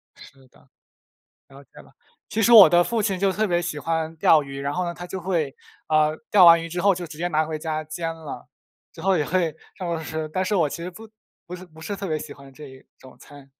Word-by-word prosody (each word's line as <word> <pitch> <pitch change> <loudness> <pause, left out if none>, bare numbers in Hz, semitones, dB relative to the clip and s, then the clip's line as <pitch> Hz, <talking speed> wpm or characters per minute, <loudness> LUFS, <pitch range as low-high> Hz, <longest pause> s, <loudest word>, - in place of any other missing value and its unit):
是 135 -1 -17
的。 - - -26 0.8
了 140 +1 -15
解 - - -45
了。 - - -21 0.4
其 225 - -1
实 235 - +4
我 215 -4 +10
的 175 0 +5
父 230 +4 -1
亲 195 -3 -1
就 195 0 +2
特 215 +3 -1
别 175 -3 0
喜 170 -3 -4
欢 160 +1 -3
钓 155 0 +4
鱼， 140 -1 -8
然 140 +1 -3
后 180 +4 -2
呢， 170 0 -4
他 175 +1 -9
就 190 +1 -6
会， 165 -6 -2 0.3
呃， 155 0 +2
钓 200 -4 +6
完 170 0 +7
鱼 165 - -6
之 175 +2 -3
后 200 +1 +3
就 175 0 -6
直 155 -1 -12
接 175 +2 -1
拿 155 -2 +1
回 155 0 -5
家 155 0 -4
煎 165 +2 -5
了， 160 -3 -10 0.4
之 - - -13
后 190 +1 +2
也 150 - 0
会 170 -3 0 0.2
让 180 - -5
我 165 -1 -3
吃， 155 0 -4
但 185 +4 -1
是 190 - -1
我 165 -6 +2
其 170 - -7
实 180 - -5
不 220 +5 -13 0.4
不 180 - -8
是 180 0 -10
不 160 -2 -17
是 180 +6 -4
特 195 0 -6
别 155 -1 -1
喜 150 -1 -9
欢 140 -1 -15
这 150 +3 -12
一 130 0 -15
种 130 -1 -16
餐。 145 -2 -16
165 Hz, 280 characters per minute, -23 LUFS, 155-180 Hz, 0.8 s, 我